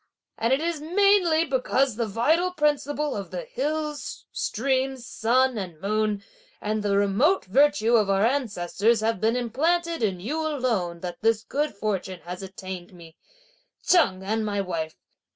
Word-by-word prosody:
And 230 +2 +1
it 265 +3 +3
is 330 -2 -2
mainly 355 -1 +3
because 265 -2 +1
the 230 0 -1
vital 310 - +2
principle 295 -2 0
of 200 -2 -5
the - - -5
hills, 310 - -4
streams, 265 0 -1
sun, 245 +2 +1
and 175 -5 -7
moon, 210 +1 0 0.4
and 215 +1 -2
the 200 -1 +1
remote 205 - +2
virtue 265 +1 +3
of 210 -3 +2
our 195 +2 +3
ancestors 225 -3 +1
have 220 -3 0
been 225 +2 +2
implanted 330 +8 0
in 195 -5 0
you 270 - -3
alone 230 - -1
that 175 -1 -6
this 225 0 +2
good 290 -2 -2
fortune 195 -3 -3
has 180 +2 -7
attained 190 -1 -8
me 165 -2 -14 0.7
Cheng 195 - +3
and 220 +3 -1
my 205 -1 -1
wife! 165 -5 -3
230 Hz, 150 wpm, -25 LUFS, 200-295 Hz, 0.7 s, it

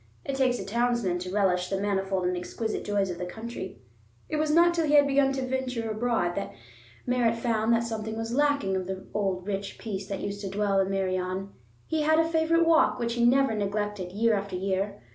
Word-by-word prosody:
It 275 - -2
takes 260 -2 +2
a 195 - -6
townsman 235 -4 0
to 180 +1 -5
relish 185 -3 +1
the 195 - -1
manifold 195 -2 0
and 180 0 +1
exquisite 215 +5 -3
joys 200 -2 0
of 175 - -7
the 180 - -3
country. 190 - -7 0.5
It 305 - -1
was 305 0 +1
not 340 +3 +5
till 330 -2 0
he 295 0 +7
began 275 -1 +3
to 265 -1 -2
venture 250 -3 -2
abroad 215 -5 0
that 200 - -5 0.5
Merritt 245 -2 +2
found 230 -1 +1
that 230 0 +2
something 220 -1 -4
was 225 +1 -3
lacking 285 -8 +2
of 185 -1 -2
the 190 0 -5
old 190 -3 -1
rich 195 -1 -4
peace 195 -3 -5
that 195 -1 -4
used 205 0 -4
to 195 - -4
dwell 200 0 +1
in 190 0 +1
Meirion. 185 0 -1 0.4
He 320 -1 -1
had 315 +1 +3
a 325 0 +3
favorite 330 +1 +2
walk 330 -1 +4
which 235 -1 -1
he 240 0 0
never 270 0 +4
neglected, 205 -2 -2
year 225 +4 +2
after 200 -2 -2
year. 195 0 -2
210 Hz, 210 wpm, -27 LUFS, 195-250 Hz, 0.5 s, he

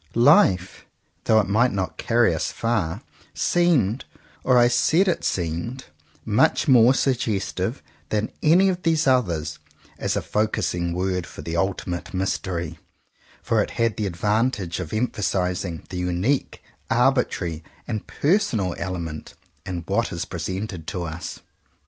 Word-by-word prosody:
"Life," 105 - +4 0.4
though 110 - +5
it - - -4
might 115 +5 +3
not 95 -5 -3
carry 120 -6 +3
us 80 - -2
far, 105 -5 -1 0.3
seemed, 140 - +2 0.4
or 130 -1 +4
I 120 0 +6
said 160 +10 +3
it 180 - 0
seemed, 90 +10 -2 0.4
much 115 +8 +2
more 125 -1 +6
suggestive 115 -9 -1 0.3
than 110 0 -1
any 175 +5 +5
of 180 -1 -2
these 160 -2 +2
others, 85 - +1 0.4
as - - -1
a - - -1
focusing 90 -5 -1
word 90 -1 -1
for - - -10
the 85 - -4
ultimate 90 0 -2
mystery; 95 -2 -2 0.6
for - - +2
it - - -2
had 115 -2 +1
the 105 -2 -2
advantage 105 0 0
of 85 -4 -5
emphasizing 95 -6 -1
the 90 - -5
unique, 90 +10 -1 0.3
arbitrary, 115 - +1 0.2
and 110 -3 -4
personal 120 - +1
element 85 -4 -5 0.3
in 90 -2 -3
what 105 +6 0
is 85 +1 -3
presented 95 0 -5
to 90 - -3
us. 85 +1 -6
100 Hz, 135 wpm, -23 LUFS, 90-120 Hz, 0.6 s, I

